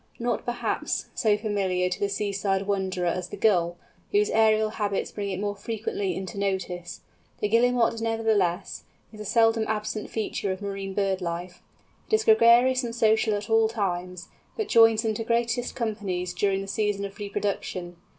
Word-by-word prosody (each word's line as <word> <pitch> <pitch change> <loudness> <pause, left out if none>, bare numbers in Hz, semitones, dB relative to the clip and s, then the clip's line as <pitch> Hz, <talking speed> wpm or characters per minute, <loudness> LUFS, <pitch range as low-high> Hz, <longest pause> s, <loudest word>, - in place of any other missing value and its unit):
Not, 240 0 -2
perhaps, 240 0 -2
so 215 -3 +2
familiar 195 -4 0
to 180 - -3
the 200 - 0
sea 200 +1 -2
side 195 0 0
wanderer 190 -2 -1
as 180 +1 -1
the 205 - -7
Gull, 175 -5 +2 0.3
whose 415 0 +2
ærial 220 -1 +3
habits 205 -3 -2
bring 200 -1 -4
it 190 -1 -3
more 205 0 -2
frequently 205 -2 -3
into 190 +1 -5
notice, 185 -3 -3 0.4
the 210 - 0
Guillemot, 230 0 +2
nevertheless, 220 -5 0 0.3
is 215 - -11
a 210 - -6
seldom 225 +1 +3
absent 215 0 -3
feature 210 -2 -2
of 185 - -4
marine 195 -1 -5
bird 195 -2 0
life. 175 +1 -5 0.5
It 435 - +3
is 435 - +1
gregarious 255 - +5
and 230 -1 -4
social 220 -1 +3
at 205 0 -4
all 225 0 +3
times, 180 -5 -3 0.3
but 435 -2 -1
joins 225 0 +5
into 220 0 -1
greatest 235 +1 0
companies 200 -6 -2
during 195 +1 +1
the 195 - -7
season 205 0 -1
of 200 +1 -9
reproduction. 195 -3 -3
205 Hz, 170 wpm, -26 LUFS, 190-225 Hz, 0.5 s, gregarious